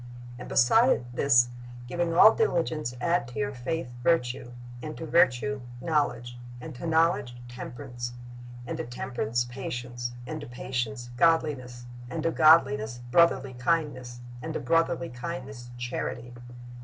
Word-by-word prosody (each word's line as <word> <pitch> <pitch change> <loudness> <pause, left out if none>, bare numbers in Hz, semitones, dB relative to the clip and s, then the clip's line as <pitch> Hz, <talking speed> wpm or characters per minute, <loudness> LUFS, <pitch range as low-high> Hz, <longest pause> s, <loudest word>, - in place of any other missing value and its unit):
"And - - -8
beside 225 - +4
this, 125 -2 +4 0.4
giving 170 +5 -1
all 215 +5 +9
diligence, 160 - 0
add 170 -3 +1
to 125 - -10
your 140 -1 -1
faith 130 +1 -4
virtue; 125 -5 +1 0.3
and 155 +2 -6
to 165 - -6
virtue 140 -3 +2 0.2
knowledge; 120 -6 -1 0.2
and 125 - -8
to 130 +7 -6
knowledge 160 -6 +2
temperance; 120 0 -7 0.5
and 155 +6 -4
to - - -1
temperance 120 -2 -2
patience; 120 -1 -5
and 125 - -5
to - - -8
patience 120 -1 -4
godliness; 135 -7 +1 0.2
and 160 +3 -4
to 165 - +1
godliness 140 -8 +4
brotherly 170 -4 +4
kindness; 125 -3 -1 0.2
and 160 +4 -5
to - - 0
brotherly 165 +4 +1
kindness 130 -2 -7
charity."' 120 0 -4
130 Hz, 130 wpm, -27 LUFS, 120-160 Hz, 0.5 s, all